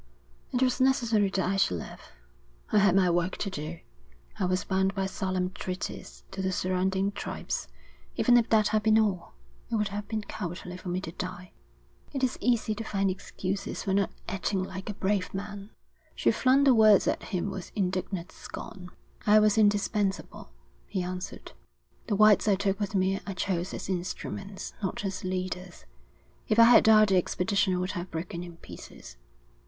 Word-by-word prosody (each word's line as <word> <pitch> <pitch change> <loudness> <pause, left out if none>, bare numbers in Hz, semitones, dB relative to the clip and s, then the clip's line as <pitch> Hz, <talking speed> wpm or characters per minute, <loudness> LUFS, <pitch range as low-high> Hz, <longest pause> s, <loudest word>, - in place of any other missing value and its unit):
It 250 +1 +1
was 255 0 +1
necessary 235 -6 +3
that 190 -2 0
I 195 +1 0
should 90 - +2
live. - - -8 0.7
I 210 - +5
had 195 -2 +4
my 185 -2 +4
work 175 +2 0
to 200 - -3
do. 160 0 -6 0.6
I 190 - +1
was 185 +2 0
bound 190 0 0
by 195 -1 0
solemn 185 -1 -2
treaties 185 0 -6
to 195 0 -4
the 190 0 0
surrounding 190 +2 0
tribes. 205 - -4 0.5
Even 245 - +5
if 235 -2 +4
that 215 -2 +4
had 215 0 +2
been 220 +1 +4
all, 200 - 0 0.3
it - - -1
would 210 -2 +1
have 205 +1 -5
been 220 -1 -3
cowardly 180 -3 -6
for 180 - -7
me 180 +1 -1
to 175 - -6
die.' 180 +1 -6 0.6
'It 270 -2 -3
is 255 - 0
easy 235 -3 +2
to 220 +2 -5
find 195 -3 0
excuses 195 +2 -4
for 195 - -1
not 200 0 +2 0.2
acting 195 0 -1
like 190 +2 -6
a 205 - -4
brave 190 -1 -1
man.' 200 0 -6 0.5
She - - +3
flung 265 +2 +3
the 275 -2 +6
words 215 -3 +6
at - - 0
him 195 0 -2
with 190 -2 -7
indignant 185 -2 -2
scorn. 180 -1 -9 0.4
'I 210 +1 +7
was 215 -1 +5
indispensable,' 205 - +1 0.4
he 185 - -2
answered. 180 +1 -6 0.6
'The 210 - +1
whites 215 +1 +5
I 205 - +5
took 195 +1 -1
with 205 -1 -2
me 190 +1 +2
I 195 - -4
chose 185 -1 -1
as - - -6
instruments, 190 +2 -5
not 200 +1 -3
as 195 - -4
leaders. 185 -1 -4 0.6
If 215 - +1
I 230 - +9
had 240 +1 +7
died 215 -1 +7
the 190 - +4
expedition 185 +1 +1
would 180 +1 -2
have 175 0 -5
broken 170 +1 -5
in 175 -1 -9
pieces. - - -12
195 Hz, 180 wpm, -28 LUFS, 185-210 Hz, 0.7 s, I